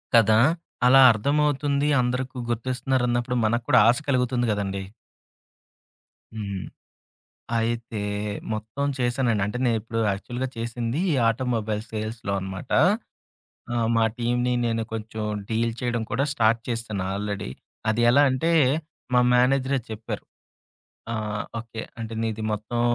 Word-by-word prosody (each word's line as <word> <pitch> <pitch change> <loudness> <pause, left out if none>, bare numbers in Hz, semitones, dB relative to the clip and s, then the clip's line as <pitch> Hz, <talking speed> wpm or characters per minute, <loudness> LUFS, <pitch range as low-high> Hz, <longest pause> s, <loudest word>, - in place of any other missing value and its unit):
కదా! 110 -1 +6 0.5
అలా 135 +1 +8
అర్థమవుతుంది 145 +4 +1
అందరికి 125 +1 -2
గుర్తిస్తున్నారన్నప్పుడు, 125 0 0
మనకు 120 +2 0
కూడా - - +7
ఆశ 125 - +4
కలుగుతుంది 125 -2 +1
గదండీ! 100 -2 -2 1.5
హ్మ్. 100 -4 -5 1.0
అయితే 115 -1 -2 0.5
మొత్తం 110 +6 -3
చేశానండి. 120 -3 +1
అంటే, 105 +4 -3
నేనిప్పుడు 115 0 -1
యాక్చువల్‌గా 120 +6 -3
చేసింది 115 +4 -2
ఈ - - +2 0.2
ఆటోమొబైల్ 115 -3 -1
సేల్స్‌లో 110 -1 -3
అనమాట. 95 +4 -7 1.0
ఆ! - - -1 0.2
మా 115 - +4
టీమ్‌ని 120 +1 +1
నేను 115 -1 0
కొంచెం, 110 0 -5 0.3
డీల్ 115 +1 0
చేయడం 120 -2 -1
కూడా 130 +6 +1
స్టార్ట్ 115 -1 +3
చేశాను 115 -5 -3
ఆల్రెడీ. 100 -8 -3 0.4
అది 110 +2 0
ఎలా 140 +3 +6
అంటే, 145 +6 +1 0.6
మా 125 - +6
మేనేజరే 130 +2 +3
చెప్పారు. 110 0 -5 0.9
ఆ! - - -2 0.4
ఓకే. 115 -1 -7 0.2
"అంటే 115 0 -5
నీది 110 -1 -2
మొత్తం 110 +3 -3
115 Hz, 115 wpm, -25 LUFS, 110-125 Hz, 1.5 s, అలా